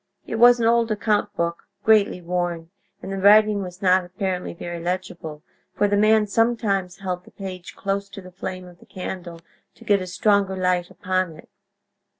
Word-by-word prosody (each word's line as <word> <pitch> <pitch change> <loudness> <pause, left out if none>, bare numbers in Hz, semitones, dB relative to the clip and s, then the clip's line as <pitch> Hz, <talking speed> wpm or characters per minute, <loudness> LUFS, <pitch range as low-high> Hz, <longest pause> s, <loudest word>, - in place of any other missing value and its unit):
It 225 - -4
was 240 +1 +7
an 230 - +1
old 230 0 +3
account 210 -1 0
book, 170 0 -3 0.2
greatly 215 -4 +3
worn; 175 -1 -3 0.3
and 190 - -6
the 195 - -3
writing 210 +1 +5
was 180 0 -8
not, 185 0 +4
apparently, 180 0 -3
very 170 0 -6
legible, 170 -4 -4 0.3
for 205 +1 +2
the 205 - +1
man 215 +1 +4
sometimes 205 -4 0
held 180 -2 -3
the - - -17
page 185 -3 -8
close 200 0 -3
to 200 - -9
the 185 0 -13
flame 185 +1 -6
of 175 -1 -15
the - - -19
candle 180 -2 -7 0.3
to - - -16
get 205 -2 +3
a 185 - -5
stronger 200 0 +1
light 180 -1 0
upon 185 -2 -2
it. - - -16
190 Hz, 180 wpm, -23 LUFS, 180-205 Hz, 0.3 s, was